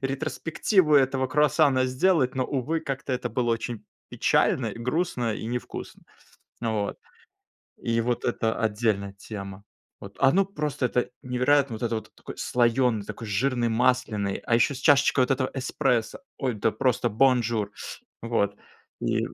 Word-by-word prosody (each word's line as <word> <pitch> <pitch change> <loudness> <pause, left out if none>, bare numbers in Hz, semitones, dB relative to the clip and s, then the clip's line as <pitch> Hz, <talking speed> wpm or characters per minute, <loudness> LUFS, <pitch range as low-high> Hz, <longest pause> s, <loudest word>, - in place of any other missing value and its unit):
ретроспективу 155 +5 +1
этого 130 -1 +2
круассана 145 -1 +3
сделать, 130 0 +2
но, 130 -1 0
увы, 145 +5 -1
как-то 135 -2 -4
это 125 - -2
было 120 -2 0
очень 115 -1 -3 0.2
печально, - - +1
грустно 125 -2 -1
и 110 - -6
не 120 +2 -1
вкусно. - - -9 0.6
Вот. 110 -3 -1 0.8
И 115 0 -1
вот 120 +1 -1
это 115 -2 0
отдельная 105 -2 0
тема. 100 -1 -8 0.4
Вот. 100 0 -11
Оно 175 +9 +4
просто 150 -8 -2
это 125 +1 -1
невероятно. 130 +1 +2
Вот 110 - -10
это 115 -1 0
вот 110 - -8
такой - - -10
слоёный, 120 -2 +2
такой 115 - -7
жирный, 120 +3 0
масляный, 115 -4 +1
а 120 - +2
ещё 120 +4 +3
с - - -7
чашечкой 140 -2 +4
вот - - -13
этого 130 -1 -1
эспрессо. 130 -3 -1 0.2
Ой, 130 -3 -1
да 105 +1 +1
просто 120 +1 0
бонжур 115 -3 +2 0.5
Вот. 100 -3 0 0.5
И - - +1
125 Hz, 145 wpm, -26 LUFS, 115-135 Hz, 0.8 s, Оно